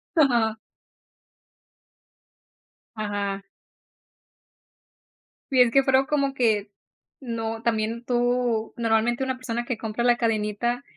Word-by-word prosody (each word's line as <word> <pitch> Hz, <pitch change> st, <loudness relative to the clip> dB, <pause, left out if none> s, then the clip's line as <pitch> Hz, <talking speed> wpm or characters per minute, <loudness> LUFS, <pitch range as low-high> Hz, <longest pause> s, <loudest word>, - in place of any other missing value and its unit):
Ajá. 235 Hz, -7 st, +3 dB, 2.4 s
Ajá. 205 Hz, -2 st, -3 dB, 2.1 s
Y 260 Hz, -2 st, +5 dB
es 240 Hz, -2 st, +5 dB
que, 275 Hz, +2 st, +4 dB
fueron 265 Hz, 0 st, +3 dB
como 280 Hz, -2 st, 0 dB
que, 215 Hz, -5 st, +1 dB, 0.5 s
no, 225 Hz, -2 st, -4 dB
también 230 Hz, 0 st, -1 dB
tú 245 Hz, -2 st, 0 dB
normalmente 235 Hz, +2 st, +1 dB
una 260 Hz, -1 st, -1 dB
persona 240 Hz, -1 st, -4 dB
que 250 Hz, -, -3 dB
compra 225 Hz, +1 st, -3 dB
la 240 Hz, -1 st, +4 dB
cadenita 225 Hz, +2 st, -1 dB
235 Hz, 100 wpm, -25 LUFS, 220-250 Hz, 2.4 s, Y